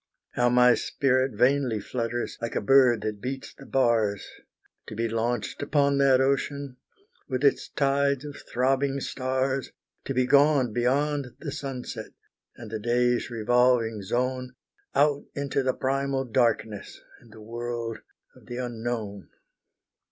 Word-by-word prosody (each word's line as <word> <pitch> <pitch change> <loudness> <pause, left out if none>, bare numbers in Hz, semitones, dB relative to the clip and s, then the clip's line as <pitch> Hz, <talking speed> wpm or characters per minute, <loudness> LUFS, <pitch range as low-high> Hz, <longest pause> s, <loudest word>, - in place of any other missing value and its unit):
How 120 0 +2
my 125 0 +6
spirit 130 0 +1
vainly 125 -1 +2
flutters, 120 +2 -3
like 115 - -4
a - - +2
bird 125 -1 +5
that 105 -1 -4
beats 135 +1 -5
the 135 - -14
bars, 115 -6 +1 0.6
To 110 - -7
be 115 +2 0
launched 115 -1 -2
upon 140 -1 +2
that 135 -2 +5
ocean, 140 0 -1 0.5
with 130 0 -2
its 140 - +2
tides 140 0 +1
of 145 -1 -7 0.2
throbbing 135 +2 +1
stars, 130 0 -2 0.3
To 135 - -3
be 130 0 +3
gone 140 -3 +4
beyond 135 +2 0
the 150 - -6
sunset, 135 -3 -6 0.4
and 115 -2 -10
the 110 - -3
day's 120 +2 +1
revolving 120 -1 +2
zone, 125 +4 -2 0.4
Out 145 0 +3
into 140 -1 -1
the 130 -1 +1
primal 135 0 -1
darkness, 115 -4 0 0.2
and 115 - -20
the 110 - -13
world 115 0 -4 0.4
of - - -19
the 120 0 -6
unknown! 115 -5 -4
125 Hz, 135 wpm, -26 LUFS, 115-135 Hz, 0.6 s, my